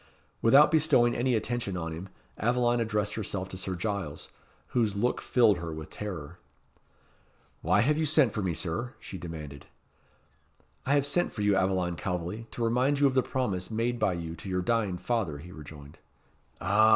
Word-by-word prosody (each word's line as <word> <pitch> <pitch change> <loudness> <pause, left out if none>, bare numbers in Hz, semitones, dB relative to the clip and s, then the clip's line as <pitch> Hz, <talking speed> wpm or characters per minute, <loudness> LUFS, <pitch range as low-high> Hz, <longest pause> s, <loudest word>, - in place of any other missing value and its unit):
Without 140 +6 +7
bestowing 145 -7 +4
any 125 +1 +1
attention 110 -4 -2
on 80 -1 -3
him, 85 +4 -7 0.3
Aveline 120 +1 +2
addressed 105 -2 0
herself 95 -3 -3
to 95 - -7
Sir 95 0 -3
Giles, 95 -5 -3 0.4
whose 110 -5 +1
look 120 +5 0
filled 110 -7 +4
her 85 -1 -5
with 80 0 -7
terror. 90 -5 -6 1.2
"Why 90 +5 +3
have 150 +6 +2
you 160 - +1
sent 145 -6 +4
for 105 - -2
me, 90 -4 -1
Sir?" 90 +10 -3
she 95 - -8
demanded. 75 -4 -8 1.2
"I 140 - +4
have 140 -1 +3
sent 175 +5 +1
for 105 - -3
you, 105 -1 +4
Aveline 95 -2 +1
Calveley, 90 +7 -4
to 120 - -4
remind 125 +5 +2
you 145 - +5
of 135 - +3
the 130 - +4
promise 105 -9 -2
made 115 +2 -1
by 105 -4 +2
you 85 -1 -5
to 100 - -8
your 90 -1 0
dying 105 -3 0
father," 100 -8 -1
he 85 +5 -11
rejoined. 75 -3 -11 0.6
"Ah!" 105 +4 +4
105 Hz, 175 wpm, -29 LUFS, 90-120 Hz, 1.2 s, Without